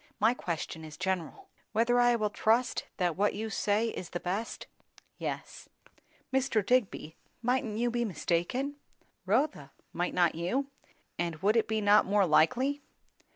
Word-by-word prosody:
My 220 +3 +4
question 165 -7 -4
was 155 -1 -10
general." 190 - -3 0.3
"Whether 235 +2 +3
I 245 0 +5
will 215 -2 0
trust 230 +4 +1
that 175 -4 +1
what 205 +2 +1
you 220 +2 -4
say 210 +3 +1
is 185 - -6
the 175 - -4
best?" 195 +6 -3 0.5
"Yes." - - -5 0.6
"Mr. 255 -6 +1
Digby, 215 -10 0 0.3
mightn't 245 -3 0
you 240 +1 +1
be 240 0 0
mistaken?" 215 - -1 0.5
"Rotha, 215 - +1 0.2
might 175 +1 -2
not 175 -2 +3
you? 180 +12 -1 0.5
And 170 -2 -1
would 210 +3 +4
it 230 - +2
not 205 +1 +6
be - - -9
more 205 -1 +4
likely?" 255 - +3
210 Hz, 150 wpm, -30 LUFS, 175-245 Hz, 0.6 s, not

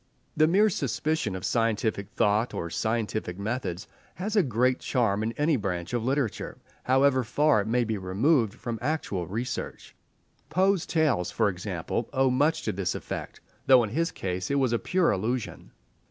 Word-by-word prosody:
The 155 0 +4
mere 200 +6 +4
suspicion 150 - -1
of 95 - -5
scientific 110 -3 0
thought 110 +1 +1
or 85 - -4
scientific 110 -2 -2
methods 100 -4 -3 0.3
has 205 +6 -3
a 205 - +6
great 125 - +1
charm 110 -6 0
in 110 +1 -1
any 150 +2 +1
branch 90 -3 -3
of 120 -2 0
literature, 130 -2 -1 0.3
however 130 0 +3
far 145 0 +3
it 100 - -5
may 120 +2 +2
be 110 -3 -2
removed 110 - +1
from 120 -3 -5
actual 120 - -2
research. 120 +5 -5 0.6
Poe's 185 +2 +2
tales, 145 - +1
for 110 -3 +1
example, 95 +3 -3
owe 135 -1 +3
much 150 +5 +2
to - - -1
this 90 -1 -2
effect, - - -6 0.3
though 130 -2 +7
in 105 - -4
his 165 +6 0
case 90 0 -4
it 140 - +1
was 130 -4 +2
a 115 - +1
pure 180 -2 +2
illusion. 110 +3 -3
120 Hz, 170 wpm, -27 LUFS, 100-140 Hz, 0.6 s, though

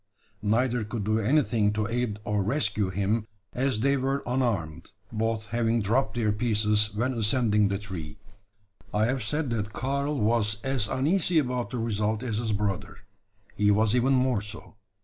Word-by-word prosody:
Neither 120 +3 +1
could 105 0 -4
do 110 +2 +1
anything 110 -4 +2
to 105 0 -1
aid 115 -1 -1
or 105 -1 0
rescue 105 -3 0
him, 100 +4 -1 0.3
as 130 -4 0
they 140 +2 +3
were 135 +1 -1
unarmed 115 - -1 0.2
both 110 0 -2
having 115 0 +1
dropped 110 +2 +1
their 110 -3 +1
pieces 105 -1 +1
when 125 +5 0
ascending 110 -2 +2
the 100 0 -1
tree. 90 -7 -6 0.7
I 105 +1 +2
have 130 +2 0
said 140 +5 -1
that 105 -2 -2
Karl 140 +4 -1
was 105 -1 +1
as 135 -6 0
uneasy 165 - +1
about 125 -4 0
the 125 - -4
result 110 0 -1
as 110 -4 -2
his 115 -2 -1
brother. 105 -1 -2 0.6
He 105 0 +2
was 105 +1 +3
even 125 +2 +3
more 130 -4 +2
so. 105 +2 -8
110 Hz, 165 wpm, -27 LUFS, 105-125 Hz, 0.7 s, they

